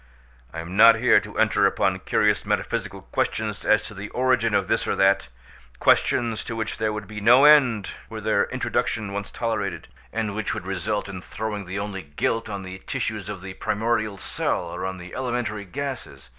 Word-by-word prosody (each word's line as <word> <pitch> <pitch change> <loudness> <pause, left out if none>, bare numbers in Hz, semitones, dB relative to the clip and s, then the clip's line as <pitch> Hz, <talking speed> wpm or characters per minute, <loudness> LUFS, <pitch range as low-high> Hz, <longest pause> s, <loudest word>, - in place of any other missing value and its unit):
I 80 - -5
am 85 +3 -7
not 115 +2 +8
here - - +5
to - - -10
enter - - +4
upon - - 0
curious - - +2
metaphysical - - -2
questions 105 -2 -1
as 105 0 +3
to 105 - -8
the 100 +1 -7
origin 125 -3 +2
of - - +1
this - - +1
or - - +1
that—questions 65 - +1
to 115 - -4
which 110 -1 -3
there 110 -1 +1
would 105 -1 -5
be 105 -1 -7
no 120 +6 +7
end 130 -9 +5 0.2
were - - -6
their - - +2
introduction 105 -3 -2
once 100 0 -4
tolerated, 115 -2 -3 0.2
and 110 -1 -2
which 110 0 -2
would - - -6
result 95 +3 -2
in 95 -2 -7
throwing 105 0 -5
the 95 +2 -5
only 100 -1 -4
guilt 95 +9 -2
on 100 -2 -5
the 95 0 -8
tissues 105 -3 -3
of 105 -3 -6
the 95 0 -7
primordial 110 0 -1
cell, 90 - -2
or 90 +2 -3
on 95 0 -5
the 90 0 -10
elementary 120 -5 -2
gases. 95 - -6
105 Hz, 185 wpm, -24 LUFS, 95-115 Hz, 0.2 s, not